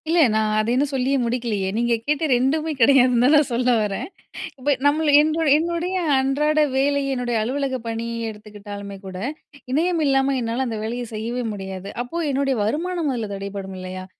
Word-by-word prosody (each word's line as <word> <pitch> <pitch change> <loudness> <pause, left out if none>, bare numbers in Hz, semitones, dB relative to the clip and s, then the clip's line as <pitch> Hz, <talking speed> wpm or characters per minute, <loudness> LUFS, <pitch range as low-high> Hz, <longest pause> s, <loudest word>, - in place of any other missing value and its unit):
இல்ல 340 +1 +3
நான் 215 0 +1
அத 215 - 0
இன்னும் 275 +3 +1
சொல்லியே 270 +1 +1
முடிக்கலயே! 230 -5 -1
நீங்க 235 0 +1
கேட்ட 300 +2 +1
2ம்மே 305 +6 0
கிடையாதுன்னு 250 -1 +5
தான் 270 +4 +5
நான் 295 -3 +2
சொல்ல 250 +1 +2
வரேன் 210 -2 -2 0.5
இப்ப 285 +3 +2
நம்மள 295 +1 +3
என்ரு 315 +1 0
என்னுடைய 340 +3 -1 0.2
அன்றாட 295 +3 +1 0.2
வேலை, 280 +1 +2
என்னுடைய 245 -2 -1
அலுவலக 265 +2 -1
பணிய 230 0 -3
எடுத்துக்கிட்டாலுமே 205 -1 -9
கூட, 185 -1 -7 0.5
இணையம் 330 +4 +1
இல்லாம 270 0 +2
என்னால 235 +3 -1
அந்த 225 -2 -3
வேலையை 240 +2 -3
செய்யவே 235 +3 -3
முடியாது. 190 -1 -7
அப்போ 335 +7 -4
என்னுடைய 275 0 0
வருமானம் 325 - -1
அதுல 225 -4 -3
தடைபடும் 195 -1 -6
இல்லயா! 185 0 -7
250 Hz, 160 wpm, -22 LUFS, 215-285 Hz, 0.5 s, கிடையாதுன்னு